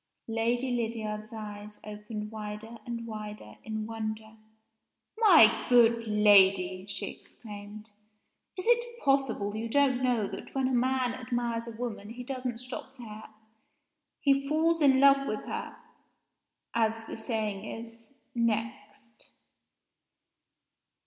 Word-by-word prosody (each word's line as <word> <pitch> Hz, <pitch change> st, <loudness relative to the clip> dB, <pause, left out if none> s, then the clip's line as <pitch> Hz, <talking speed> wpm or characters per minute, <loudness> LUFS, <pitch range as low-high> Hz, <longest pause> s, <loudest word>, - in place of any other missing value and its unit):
Lady 235 Hz, +3 st, 0 dB
Lydiard's 220 Hz, -2 st, -3 dB
eyes 210 Hz, -1 st, -8 dB
opened 210 Hz, 0 st, -6 dB
wider 215 Hz, +1 st, -7 dB
and 235 Hz, -1 st, -4 dB
wider 210 Hz, -, -8 dB
in 220 Hz, -1 st, -4 dB
wonder. 220 Hz, 0 st, -5 dB, 0.8 s
"My 335 Hz, -, +7 dB
good 230 Hz, -2 st, +5 dB
lady!" 195 Hz, -3 st, +5 dB
she 200 Hz, -1 st, -4 dB
exclaimed, 210 Hz, -1 st, -11 dB, 0.7 s
"is 370 Hz, -, -4 dB
it 475 Hz, 0 st, +2 dB
possible 265 Hz, -7 st, +1 dB
you 225 Hz, +1 st, -3 dB
don't 265 Hz, -1 st, +3 dB
know 245 Hz, -4 st, +2 dB
that -, -, -8 dB
when 265 Hz, -1 st, +2 dB
a 260 Hz, -, -1 dB
man 255 Hz, 0 st, +1 dB
admires 240 Hz, -2 st, -2 dB
a -, -, -5 dB
women 225 Hz, -4 st, -5 dB
he 245 Hz, +2 st, -7 dB
doesn't 255 Hz, -2 st, -4 dB
stop 255 Hz, +2 st, -8 dB
there? 220 Hz, -3 st, -9 dB, 0.9 s
He 275 Hz, -1 st, +2 dB
falls 325 Hz, +2 st, +2 dB
in 270 Hz, -2 st, +5 dB
love 275 Hz, 0 st, +6 dB
with 215 Hz, -, -2 dB
her -, -, -5 dB, 1.0 s
(as 225 Hz, -1 st, +1 dB
the -, -, -6 dB
saying 220 Hz, -3 st, -3 dB
is) 230 Hz, +4 st, -9 dB, 0.2 s
next." 225 Hz, -1 st, -3 dB
230 Hz, 120 wpm, -29 LUFS, 215-255 Hz, 1.0 s, My